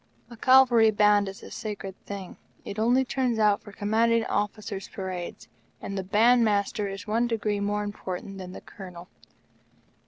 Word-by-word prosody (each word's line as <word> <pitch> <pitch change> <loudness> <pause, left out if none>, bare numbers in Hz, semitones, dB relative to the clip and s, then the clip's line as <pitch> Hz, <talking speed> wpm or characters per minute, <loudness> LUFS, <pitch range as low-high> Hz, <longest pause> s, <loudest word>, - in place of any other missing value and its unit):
A - - -8
Cavalry 245 -2 +6
Band 205 -1 +3
is 195 - -11
a - - -10
sacred 205 -3 -6
thing. 195 -3 -7 0.3
It 200 - -5
only 245 +4 +3
turns 250 -2 0
out 210 -2 +3
for 205 - -12
Commanding 225 +3 +1
Officers' 205 -1 -3
parades, 185 -3 -6 0.3
and 200 - -6
the 190 - -1
Band 230 +5 +4
Master 205 0 0
is 195 +1 -6
one 230 +3 +1
degree 215 -3 -1
more 205 +1 -1
important 195 -1 -6
than 185 -1 -7
the - - -9
Colonel. 180 -3 -11
205 Hz, 160 wpm, -27 LUFS, 195-225 Hz, 0.3 s, Cavalry